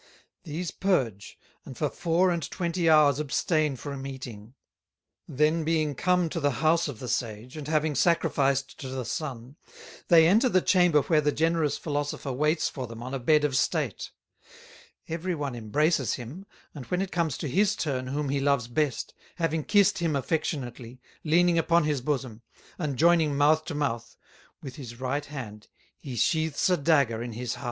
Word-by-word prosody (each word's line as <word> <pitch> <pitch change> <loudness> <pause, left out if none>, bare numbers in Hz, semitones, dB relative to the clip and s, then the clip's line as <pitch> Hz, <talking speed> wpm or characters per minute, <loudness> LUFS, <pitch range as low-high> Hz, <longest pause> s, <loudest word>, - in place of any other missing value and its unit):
These 165 +2 -4
purge, 125 - -1 0.3
and - - -10
for - - 0
Four 175 +2 +1
and 170 -1 -1
Twenty 170 -1 -1
hours 150 -3 +5
abstain 150 0 0
from 135 +1 -6
Eating; 120 -4 -9 0.7
then 155 +4 +1
being 155 -2 0
come 180 +4 +1
to 165 - -3
the 145 -4 0
House 165 +1 +3
of 140 -6 -6
the 125 - -7
Sage, 115 +1 -3
and 150 -2 -7
having 155 0 +1
Sacrificed 140 -3 +1
to 135 - -6
the 130 -1 -4
Sun, 135 -2 -5 0.5
they 165 -2 +7
enter 220 +8 +4
the 185 - +4
Chamber 175 -6 +3
where 155 -3 +2
the 150 0 +1
generous 160 -1 +1
Philosopher 145 -2 -3
waits 150 +5 +1
for 130 -3 -5
them 115 0 -9
on 130 +2 -6
a 135 - -2
Bed 150 +4 +3
of 145 -3 0
State; 145 - -1 1.0
every 170 +2 -3
one 145 -4 -3
embraces 145 +9 0
him, 140 - -9 0.3
and 140 -5 -9
when 180 +1 0
it 190 - -6
comes 165 -6 -1
to - - -4
his 200 +9 +2
turn 130 -8 -2
whom 145 +2 -2
he 140 0 0
loves 140 -4 +1
best, 140 +1 -1 0.2
having 160 -3 -1
kissed 205 +1 +3
him 165 -4 0
affectionately, 130 -4 -3 0.2
leaning 170 +2 +3
upon 170 0 +3
his 150 -3 0
Bosom, 130 -5 -3 0.4
and 145 -6 -2
joyning 160 -2 +4
Mouth 155 +2 +3
to 160 - -5
Mouth, 120 -5 -3 0.5
with 135 +2 -8
his 120 -4 -9
right 130 +3 -2
hand 115 -8 -8 0.3
he 135 -5 -7
sheaths 160 - +1
a 180 - +3
Dagger 140 -7 +2
in 120 -1 -5
his 120 +1 -3
Heart." - - -9
150 Hz, 175 wpm, -27 LUFS, 130-165 Hz, 1.0 s, they